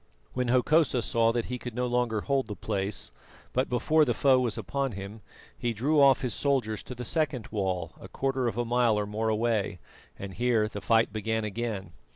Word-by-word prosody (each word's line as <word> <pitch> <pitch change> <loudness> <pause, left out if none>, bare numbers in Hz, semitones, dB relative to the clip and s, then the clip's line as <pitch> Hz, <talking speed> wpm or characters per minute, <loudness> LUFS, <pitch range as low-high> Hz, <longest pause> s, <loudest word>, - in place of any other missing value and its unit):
When 125 -1 -1
Hokosa 130 +1 +3
saw 115 0 +2
that 115 -1 -1
he 125 0 -4
could 120 -2 -7
no 125 0 0
longer 120 -3 0
hold 135 -1 0
the 105 - -5
place, 100 -3 -3 0.4
but 130 +1 +1
before 155 +6 +3
the 125 -5 +1
foe 135 -2 +4
was 120 -3 0
upon 135 +4 -2
him, 100 +3 -8 0.3
he 120 -1 -2
drew 145 +8 +1
off 135 -1 +6
his 125 -4 -1
soldiers 125 -7 0
to 125 - -7
the 125 0 -6
second 140 -5 -1
wall, 95 -4 -2
a - - -9
quarter 135 -2 -1
of 115 - -3
a 120 - 0
mile 120 -2 +2
or 105 - 0
more 110 +2 -2
away, 110 -3 0 0.4
and 100 -1 -7
here 120 -2 +2
the 105 -1 -7
fight 115 -2 +2
began 110 +1 -1
again. 105 -4 -4
120 Hz, 200 wpm, -28 LUFS, 105-125 Hz, 0.4 s, off